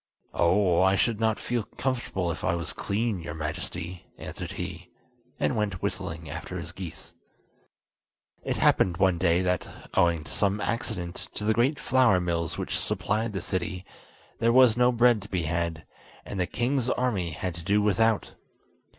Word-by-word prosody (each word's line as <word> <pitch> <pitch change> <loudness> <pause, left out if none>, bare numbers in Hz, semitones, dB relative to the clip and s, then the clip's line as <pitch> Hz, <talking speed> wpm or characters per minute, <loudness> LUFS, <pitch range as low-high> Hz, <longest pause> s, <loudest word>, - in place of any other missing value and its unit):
"Oh, 90 0 +3
I 95 +1 +5
should 115 +2 +1
not 110 -1 +1
feel 120 -1 -1
comfortable 110 -7 -2
if - - -6
I 85 - +2
was 85 -3 -3
clean, 105 -2 -1
your 80 -2 -6
Majesty," 85 +3 -5
answered - - -6
he, 90 0 -6 0.5
and - - +1
went 100 -4 -2
whistling 90 -4 -3
after - - -6
his - - -5
geese. 90 -4 -8 1.3
It - - -1
happened 90 -2 +3
one 95 -3 +3
day 85 0 +3
that, 90 -1 0 0.2
owing 85 -3 +3
to - - -10
some 100 0 +1
accident 90 -6 -3 0.2
to - - -3
the 110 +1 +3
great 130 +6 +2
flour 125 -6 +4
mills 85 -2 -1
which - - -1
supplied 110 +1 -1
the 95 - -2
city, 95 +1 -3 0.5
there 115 0 +3
was 125 -2 +6
no 125 +1 +4
bread 120 -2 +4
to 100 - -11
be 90 -3 -1
had, 85 0 -2 0.4
and 100 - -5
the 90 - +1
king's 125 0 0
army 110 -11 0
had 90 +3 -4
to 85 0 -8
do 100 +4 +3
without. 105 +1 +2
95 Hz, 170 wpm, -27 LUFS, 85-115 Hz, 1.3 s, was